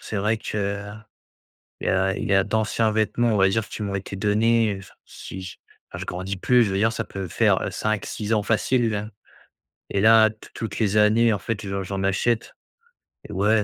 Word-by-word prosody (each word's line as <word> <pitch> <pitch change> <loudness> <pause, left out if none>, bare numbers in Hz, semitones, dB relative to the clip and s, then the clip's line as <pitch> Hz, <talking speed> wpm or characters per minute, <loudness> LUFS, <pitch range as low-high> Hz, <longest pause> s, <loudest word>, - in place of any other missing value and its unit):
c'est 110 - -5
vrai 105 +3 +1
que 100 -1 -3 1.0
il - - -4
y - - +2
a 95 0 +1
il - - -3
y 100 - +3
a 95 - +4
d'anciens 110 +1 +1
vêtements 110 +2 +1
on 105 - +2
va 95 0 +5
dire 110 +2 0
qui - - -6
m'ont 100 -1 -3
été 95 0 -5
donnés, 110 +1 +2
heu, - - -9 0.3
si 95 - -9
j 95 -1 -8 0.4
enfin - - -6
je - - -4
grandis 95 +2 -4
plus 125 +6 +4
je 105 - +1
veux 95 - -1
dire 110 +3 +2
ça - - -3
peut 95 -1 -6
faire - - +1
5-6 110 0 -2
ans 105 - +1
facile. 110 -1 0 0.8
Et 100 - +1
là 110 +1 +6
tou 110 - -15
toutes 110 -3 -5
les 105 -2 +1
années 110 +2 +4
en 100 - 0
fait 110 +1 -4
j'en 95 0 -3
j'en 95 +1 -4
achète 110 +4 0 0.8
et - - -10
ouais 105 +2 +2
105 Hz, 205 wpm, -24 LUFS, 100-110 Hz, 1.0 s, là